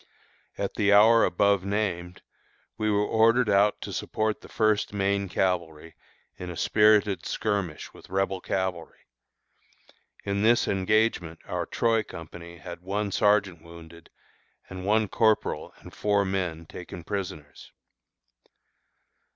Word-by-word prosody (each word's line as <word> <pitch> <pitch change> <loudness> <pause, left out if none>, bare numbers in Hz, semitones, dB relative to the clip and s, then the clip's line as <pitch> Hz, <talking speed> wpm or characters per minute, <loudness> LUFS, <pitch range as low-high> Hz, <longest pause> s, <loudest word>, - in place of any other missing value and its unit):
At - - -3
the 105 -1 +1
hour 110 +3 +6
above 100 +1 +2
named 95 -3 -3 0.5
we 110 0 -1
were 105 0 +2
ordered 115 +1 +3
out 100 +1 +3
to - - -6
support 110 0 -2
the - - -14
First 110 -2 +1
Maine 100 -1 0
Cavalry 85 -4 -2 0.4
in 90 - -7
a 85 - -7
spirited 105 -2 +3
skirmish 100 -7 -3
with - - -16
Rebel 95 0 -1
cavalry. 95 -3 -3 1.3
In 100 0 -2
this 120 +3 +3
engagement 95 -4 +1
our - - -3
Troy 115 -1 +1
company 85 -2 -10
had 85 0 -9
one 100 +2 -3
sergeant 100 -5 +2
wounded, 85 0 -14 0.6
and 95 0 -7
one 110 +1 +2
corporal 110 +2 0
and - - -14
four 100 -1 +1
men 90 -4 -3
taken 85 +1 -9
prisoners. 80 -6 -6
100 Hz, 125 wpm, -26 LUFS, 90-105 Hz, 1.3 s, hour